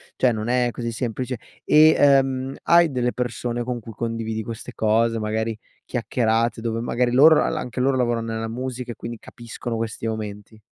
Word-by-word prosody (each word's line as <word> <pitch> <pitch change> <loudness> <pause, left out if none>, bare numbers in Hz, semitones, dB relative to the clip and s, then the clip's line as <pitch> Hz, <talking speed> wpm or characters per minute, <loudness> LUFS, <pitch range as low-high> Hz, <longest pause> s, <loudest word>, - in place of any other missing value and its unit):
cioè 125 - +3
non 110 0 -3
è 125 0 +2
così 115 0 -4
semplice, 125 +1 -3 0.3
e, 155 +1 +6
ehm, 135 -1 +3
hai 170 -1 +5
delle 125 -2 0
persone 120 -1 -3
con 120 0 -3
cui 115 - -10
condividi 110 0 -3
queste 115 +2 -7
cose, 115 +1 +1
magari 110 +1 -2 0.3
chiacchierate, 115 -1 0
dove 115 0 -2
magari 120 0 0
loro 155 +5 +7
la-la - - +1
anche 125 +1 -5
loro 130 +1 +2
lavorano 120 -2 0
nella 115 0 -3
musica 125 +1 -5
e - - -20
quindi 115 -1 -7
capiscono 120 -1 -7
questi 115 0 -3
momenti? 110 -1 -6
120 Hz, 175 wpm, -23 LUFS, 115-125 Hz, 0.3 s, loro